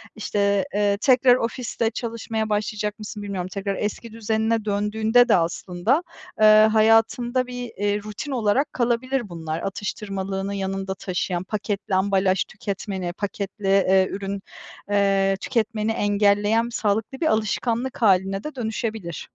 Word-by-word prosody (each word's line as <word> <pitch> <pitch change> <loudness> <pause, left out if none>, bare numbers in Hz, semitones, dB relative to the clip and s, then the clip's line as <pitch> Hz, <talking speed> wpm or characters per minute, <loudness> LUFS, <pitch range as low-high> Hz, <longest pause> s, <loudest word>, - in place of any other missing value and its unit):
İşte, 200 0 0
eee, 205 -1 +2
tekrar 255 -2 +5
ofiste 230 -1 -2
çalışmaya 225 -2 -3
başlayacak 210 0 -2
mısın, 210 0 -7
bilmiyorum. 185 -3 -4
Tekrar 200 0 -2
eski 215 +3 -4
düzenine 220 0 0
döndüğünde 220 +4 +2
de - - +6
aslında, 180 - 0 0.4
eee, 215 0 +7
hayatında 225 +3 +3
bir, 245 -1 -6
eee, 205 0 0
rutin 215 +7 -6
olarak 255 +4 +1
kalabilir 240 0 0
bunlar. 160 -1 -4
Atıştırmalığını 195 0 -4
yanında 195 0 -3
taşıyan, 180 -1 -2
paketli 205 -1 -3
ambalaj 190 0 +2
tüketmeni, 190 -3 -5
paketli, 200 +1 -5
eee, 190 -1 +4
ürün, 195 0 -4 0.5
eee, 195 -1 +2
tüketmeni 220 -2 -1
engelleyen 205 +1 +2
sağlıklı 220 +3 -1
bir 320 - +2
alışkanlık 230 +3 -1
haline 195 -2 +3
de 300 -2 -6
dönüşebilir. 220 -6 -4
210 Hz, 125 wpm, -23 LUFS, 195-225 Hz, 0.5 s, eee